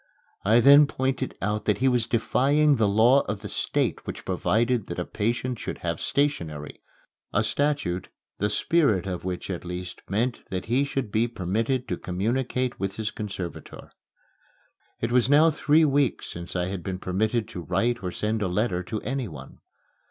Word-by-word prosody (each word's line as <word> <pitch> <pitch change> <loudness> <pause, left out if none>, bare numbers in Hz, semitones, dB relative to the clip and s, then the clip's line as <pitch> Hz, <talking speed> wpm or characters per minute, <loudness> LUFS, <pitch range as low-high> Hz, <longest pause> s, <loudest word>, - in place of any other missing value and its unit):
I 110 +4 +5
then 140 +3 +8
pointed 130 -1 -2
out 105 +1 -1
that 105 - +2
he 135 - +2
was 125 -3 +2
defying 140 +5 +3
the 110 -2 +3
law 115 +7 +5
of 100 -1 -3
the 105 - -6
State - - -1
which - - -6
provided 115 0 +1
that 85 - -5
a 90 - -2
patient 120 +3 -2
should - - -5
have - - -2
stationery 85 - -1 0.5
a - - +2
statute, 140 -12 -1 0.3
the 105 - +1
spirit 110 - +2
of 90 -2 -4
which 90 +1 -4
at 90 - -4
least 90 +1 -6
meant 115 +6 -1
that 95 -1 -3
he 130 +5 +2
should 135 -6 -3
be 110 +3 +2
permitted 115 +5 -1
to - - -2
communicate 125 +7 -1
with 95 0 -2
his 110 0 -3
conservator. 95 -5 -7 1.1
It 115 - -1
was 125 0 +3
now 155 +3 +6
three 155 +1 +3
weeks 140 -2 +1
since 85 +1 -8
I 90 -1 0
had 95 0 -4
been 95 +1 -4
permitted 105 +5 -1
to 90 - -6
write 95 +8 0
or 90 - -3
send 110 +4 -2
a 100 - +1
letter 90 0 0
to 105 +4 -5
anyone. 105 - -5
110 Hz, 175 wpm, -26 LUFS, 95-130 Hz, 1.1 s, then